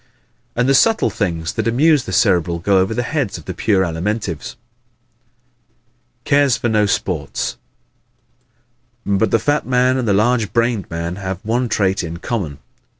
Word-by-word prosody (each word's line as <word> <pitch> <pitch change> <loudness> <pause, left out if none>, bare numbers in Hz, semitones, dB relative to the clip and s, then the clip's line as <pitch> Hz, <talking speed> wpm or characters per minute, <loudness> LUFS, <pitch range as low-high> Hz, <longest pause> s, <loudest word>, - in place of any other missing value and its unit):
And 125 +1 +1
the 135 - +4
subtle 225 +10 +3
things 85 -5 -2
that - - -2
amuse 145 +4 +3
the - - -6
Cerebral 85 -1 +2
go 95 +3 +2
over 95 +3 +1
the 120 - 0
heads 130 -6 -2
of 80 - -12
the 95 - -5
pure 95 +1 +1
Alimentives. 90 +3 -3 1.7
Cares 140 -3 +3
for 120 - -1
No 105 -1 +2
Sports 90 -6 -2 1.5
¶ 100 -1 +2
But 110 - +2
the - - +3
fat 145 +6 0
man 130 0 +2
and 125 -3 -2
the 100 - +3
large 110 +1 +1
brained 115 -4 0
man 85 +2 -4
have 95 -2 -4
one 120 +3 0
trait 95 -3 +1
in 85 0 -5
common. 90 - -4
105 Hz, 160 wpm, -18 LUFS, 90-125 Hz, 1.7 s, the